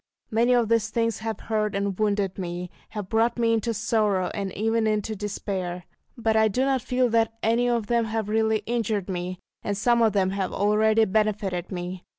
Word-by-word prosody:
Many 235 +3 +3
of 240 -2 +2
these 225 0 +2
things 230 0 0
have 220 -1 -4
hurt 215 -2 -1
and 200 -1 -1
wounded 205 -3 0
me, 180 0 -4 0.2
have 210 -3 -5
brought 225 +4 +1
me 230 -1 +2
into 225 +1 0
sorrow, 210 -4 +1
and 195 -2 -3
even 225 +1 +1
into 215 0 -1
despair. 190 -3 -4 0.3
But 225 -1 +1
I 220 0 +5
do 250 +6 0
not 270 -2 +1
feel 255 0 +1
that 225 0 +1
any 235 +2 +2
of 235 -3 0
them 235 +1 +1
have 220 -1 -2
really 220 0 +1
injured 220 -5 -1
me, 180 0 -3 0.2
and 200 -1 -2
some 235 +3 +3
of 220 -3 +4
them 190 -2 +2
have 195 -1 -2
already 215 +2 +3
benefited 200 -4 -1
me. 180 0 -5
215 Hz, 190 wpm, -25 LUFS, 195-230 Hz, 0.3 s, I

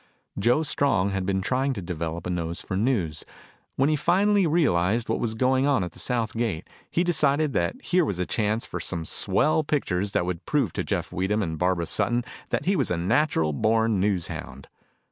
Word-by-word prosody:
Joe 120 +9 +3
Strong 110 - +1
had 95 -1 -2
been 95 -1 0
trying 130 +5 0
to 100 - -5
develop 85 -1 -4
a 90 - -2
nose 85 -1 -2
for 95 - -5
news. 95 - 0 0.5
When 135 - +2
he 155 - +2
finally 200 +5 +3
realized 115 - +2
what - - 0
was 110 -2 -2
going 130 +3 +2
on 135 -9 +2
at 90 - -5
the - - -12
south 115 -3 -1
gate, 110 -8 -2 0.2
he 175 - +1
decided 150 -4 +2
that 85 0 -1
here 180 0 +2
was 100 - -2
a 90 - -1
chance 110 +3 0
for 85 - -5
some 85 -1 -2
swell 155 - +1
pictures 100 -10 -1
that - - +1
would 90 -2 -4
prove 135 - +1
to - - -2
Jeff - - -2
Weedham 100 +4 0
and 80 -3 -3
Barbara 90 -1 +1
Sutton 120 +7 0 0.3
that - - -1
he 195 +2 +2
was 140 -7 0
a 90 - 0
natural 85 - +1
born 110 +5 +2
news 95 -3 0
hound. 70 +1 -8
105 Hz, 205 wpm, -25 LUFS, 90-140 Hz, 0.5 s, Joe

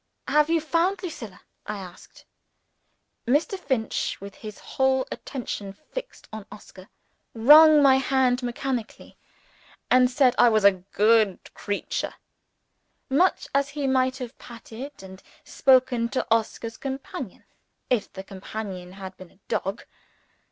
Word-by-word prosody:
"Have 300 +1 +3
you 330 0 +3
found 345 +5 0
Lucilla?" 225 - -7 0.3
I 210 - -3
asked. 180 -2 -12 1.0
Mr. 300 - +2
Finch 255 -10 -2
with 200 0 -9
his 215 -2 -10
whole 265 0 0
attention 210 -7 -6
fixed - - -9
on 220 -2 -8
Oscar 195 -2 -13 0.5
wrung 300 +5 +8
my 265 -1 +6
hand 265 -1 +1
mechanically, 245 -1 -4 0.8
and 255 0 +5
said 255 -1 +3
I 245 - +7
was 215 -2 +2
a 200 - +8
"good 210 +1 +2
creature;" 205 0 -4 1.0
much 355 +8 +2
as 280 0 +1
he 285 -1 -4
might 260 -1 +1
have 250 -1 -8
patted, 235 +2 -10
and 190 0 -12 0.2
spoken 255 -3 +3
to, 255 - -2
Oscar's 225 0 -1
companion, 265 -5 -6 0.5
if 235 -5 0
the 190 - -8
companion 190 -2 -7
had 190 -1 -9
been 185 -2 -12
a - - -27
dog. 195 +3 -3
245 Hz, 130 wpm, -25 LUFS, 205-270 Hz, 1.0 s, wrung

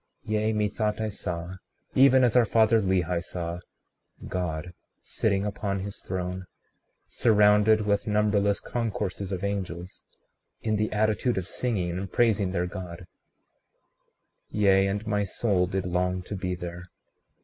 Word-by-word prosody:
36:22 - - -6
Yea, 110 +1 +1
methought 105 0 -1
I 110 0 -1
saw, 90 -3 -5 0.4
even 130 -1 +6
as 120 -1 +3
our 125 - +7
father 110 0 +4
Lehi 90 -3 0
saw, 85 -1 -5 0.7
God 90 -1 -3 0.3
sitting 100 -2 0
upon 100 -1 -2
his 100 +1 -6
throne, 90 0 -4 0.6
surrounded 105 0 +4
with 100 0 0
numberless 105 -1 +2
concourses 100 -4 -3
of 95 -1 -3
angels, 95 -3 -4 0.6
in 110 -1 +1
the 105 +1 0
attitude 110 +2 +1
of 95 -1 -2
singing 90 -9 -2
and 95 -1 -6
praising 105 -5 +2
their 90 -2 0
God; 90 -1 -7 1.4
yea, 100 -2 +3
and 100 +2 -2
my 105 -1 0
soul 95 -2 0
did 95 0 -2
long 90 0 -1
to 100 - -6
be 90 -1 -2
there. 90 0 -7
100 Hz, 140 wpm, -27 LUFS, 90-105 Hz, 1.4 s, our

